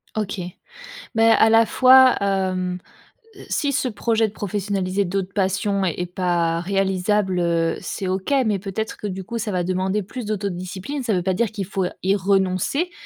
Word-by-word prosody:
OK. 210 -2 -3 0.8
Mais 225 0 +5
à 220 - +5
la 225 +1 +5
fois, 260 +2 +6
hem, 185 -2 -1 0.6
heu, - - -12
si 285 -3 0
ce 265 - 0
projet 225 0 +1
de - - -17
professionnaliser 200 -1 -2
d'autres 195 +1 -3
passion 195 0 0
est 180 0 -2
pas 175 -2 0
réalisable, 195 0 0
heu, 165 -1 +1
c'est 190 - -4
OK 190 +7 -2
mais 210 -3 0
peut-être 200 +3 -4
que 210 - -5
du 190 -1 -5
coup, 235 +3 -5
ça 215 -1 -3
va 180 -2 0
demander 190 +2 -1
plus 240 +5 -7
d'autodiscipline. 200 +5 -4
Ça 230 - 0
veut 180 -2 0
pas 190 +1 +1
dire 220 +3 0
qu'il 200 -3 -4
faut 190 0 -2 0.2
y 195 +1 +3
renoncer 195 - 0
195 Hz, 175 wpm, -22 LUFS, 185-215 Hz, 0.8 s, fois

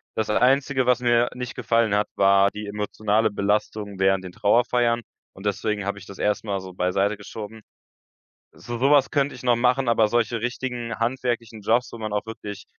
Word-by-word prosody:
Das 110 -1 -1
Einzige, 130 +2 +2
was 125 -1 +4
mir 120 0 +3
nicht 125 0 -5
gefallen 115 -3 +1
hat, 105 0 +2
war 100 0 +5
die 105 +1 -7
emotionale 105 +1 0
Belastung 105 0 -2
während 95 0 +2
den 90 - -8
Trauerfeiern 120 +3 +2 0.3
und 95 - -12
deswegen 105 0 -1
habe 100 0 -3
ich 100 - -13
das 100 - -10
erstmal 105 -1 -1
so 95 -1 -10
beiseite 95 +3 0
geschoben. 110 +1 -9 0.9
So 120 +1 -7
sowas 135 +2 +4
könnte 140 -1 +1
ich 125 - -11
noch 120 -1 +3
machen. 125 +2 +2
Aber 115 -2 +4
solche 115 0 0
richtigen 120 -2 -3
handwerklichen 120 -2 -2
Jobs, 115 +4 +1
wo 115 - -8
man 110 -2 -5
auch 105 - -1
wirklich 105 -3 -8
110 Hz, 180 wpm, -24 LUFS, 105-120 Hz, 0.9 s, war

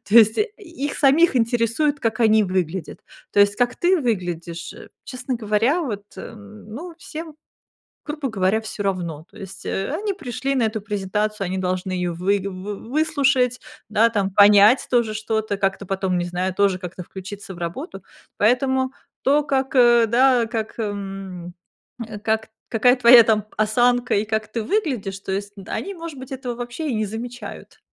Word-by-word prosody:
То 205 - -3
есть 220 -1 +7
и - - +5 0.4
их - - -4
самих 295 +4 +4
интересует, 240 +5 +1
как 225 -1 -2
они 220 -1 +5
выглядят. 180 -4 -3 0.3
То 205 - +4
есть 200 0 +4
как 245 0 +1
ты 365 +1 +3
выглядишь, 175 - -3 0.3
честно 255 0 -4
говоря, 230 +7 +1
вот, 210 -9 -4
эм, 215 -1 -11
ну, 335 +9 -7
всем, 320 -1 -8 0.7
грубо 295 -2 -3
говоря, 195 +1 +1
всё 220 -1 -5
равно. 170 -6 -3
То - - -20
есть, 195 -2 -10
э, 195 - -2
они 410 -1 -2
пришли 275 - -3
на 245 - +2
эту 220 0 -1
презентацию, 210 0 -2
они 190 +1 -2
должны 185 0 -2
её 180 -1 -1
выг 190 +3 0
вы 195 +2 -6
выслушать, 270 -4 +1 0.3
да, 220 +2 +4
там 200 -4 -1
понять 205 +5 +6
тоже 235 -3 +2
что-то, 220 -1 -2
как-то 195 0 -1
потом, 190 -1 -1
не 175 - -1
знаю, 180 +2 -2
тоже 195 -1 +2
как-то 180 0 -7
включиться 195 +2 -9
в - - -12
работу. 175 - -6 0.4
Поэтому 260 +4 +2 0.3
то, 290 +2 +3
как, 270 -1 -1
э, 240 -2 +6
да, 245 +1 +4
как 225 -1 -4
эм, 195 -4 -5 0.7
как 220 0 0 0.2
какая 245 +3 +4
твоя 240 -1 +9
там 215 -2 +2
осанка 245 +3 +2
и 205 - +2
как 220 0 -2
ты 230 - 0
выглядишь, 245 - -2
то 195 - -5
есть 200 +1 -3
д 195 - -11
они, 395 - -4
может 330 -5 -8
быть, 260 0 -9
этого 255 -2 -4
вообще 245 +6 -5
и - - -1
не 215 0 0
замечают. 235 +4 -8
220 Hz, 170 wpm, -22 LUFS, 195-250 Hz, 0.7 s, твоя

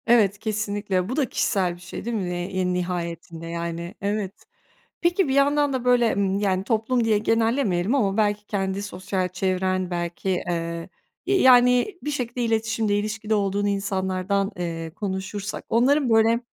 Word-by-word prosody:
Evet, 210 -4 +4
kesinlikle, 205 -3 -1
bu 255 - -2
da 280 -4 0
kişisel 185 -5 0
bir 175 - -17
şey 180 +4 -8
değil 235 0 -2
mi 185 -3 -2
ne 175 0 -3
en 185 -1 -1
nihayetinde 170 -2 -4
yani? 170 +1 -4
Evet. 200 0 -3 0.6
Peki, 345 +1 +2
bir 265 - 0
yandan 285 +1 +3
da 255 -2 -2
böyle, 245 -2 +4
hımm, 195 -1 +1
yani, 190 -2 +1
toplum 230 +3 +1
diye 220 -2 +3
genellemeyelim 225 -2 +1
ama, 205 -6 +1
belki 210 -1 +1
kendi 195 -1 -2
sosyal 185 -2 -3
çevren, 185 0 -1
belki, 175 +2 -3
eee, 170 -2 -2 0.4
ya 395 - +2
yani 250 +8 +5
bir 295 - -2
şekilde 250 -3 -3
iletişimde 225 -2 0
ilişkide 215 +1 -1
olduğunu 200 0 0
insanlardan, 195 0 -1
eee, 165 -2 -4
konuşursak, 200 +1 -4
onların 260 +4 +3
böyle, 225 +1 +4
205 Hz, 155 wpm, -24 LUFS, 185-230 Hz, 0.6 s, yani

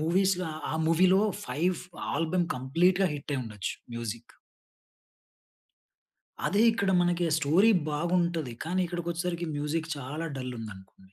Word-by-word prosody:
మూవీస్‌లో 180 +3 +2 0.3
ఆ - - -2
మూవీ‌లో 185 +4 +5 0.3
5 175 +4 0 0.4
ఆల్బమ్ 165 +3 +1
కంప్లీట్‌గా 175 +9 +2
హిట్టయిండొచ్చు 130 -8 -4 0.2
మ్యూజిక్కు. 115 0 -6 2.1
అదే 205 +3 +3
ఇక్కడ 200 -4 0
మనకి 175 0 +2
స్టోరీ 165 +9 +4 0.2
బాగుంటది. 170 -2 0
కానీ 180 +4 0
ఇక్కడికొచ్చేసరికి 175 0 -3
మ్యూజిక్ 155 +3 -2
చాలా 145 +4 -5
డల్ 130 -1 -4
ఉందనుకోండి 95 -3 -11
165 Hz, 105 wpm, -29 LUFS, 135-180 Hz, 2.1 s, మూవీ‌లో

